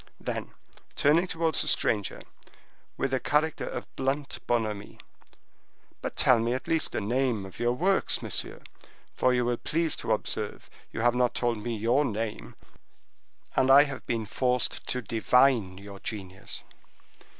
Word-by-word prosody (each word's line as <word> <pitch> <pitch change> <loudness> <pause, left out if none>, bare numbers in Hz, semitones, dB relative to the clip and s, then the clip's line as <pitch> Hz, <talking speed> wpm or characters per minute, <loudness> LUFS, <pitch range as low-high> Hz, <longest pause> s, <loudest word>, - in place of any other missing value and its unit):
Then, - - -5 0.4
turning 165 +5 +4
towards 165 -2 +1
the - - -1
stranger, 105 -3 +1 0.8
with 135 -1 -1
a 130 - +2
character 150 +4 0
of - - -5
blunt 135 +2 -2
bonhomie: 110 -4 -1 1.0
"But - - -4
tell 125 -3 +5
me 115 +2 0
at 130 - -4
least 160 -1 +1
the - - 0
name 120 -1 0
of 95 - -12
your 120 0 +2
works, 190 +9 +1
monsieur; - - -3 0.5
for 130 - +2
you 125 -1 +2
will 120 0 0
please 165 +3 0
to - - -3
observe - - -2 0.2
you - - -4
have 120 0 +4
not 125 -1 +1
told 120 -3 0
me 115 +1 -3
your 120 +7 +2
name, 105 - -4 1.0
and 130 0 +3
I 140 +2 +9
have 140 -2 -6
been 115 -2 -1
forced 125 +3 0
to 125 -1 -2
divine 115 -3 +3
your 100 0 -10
genius." 95 -4 -6
120 Hz, 150 wpm, -28 LUFS, 110-135 Hz, 1.0 s, I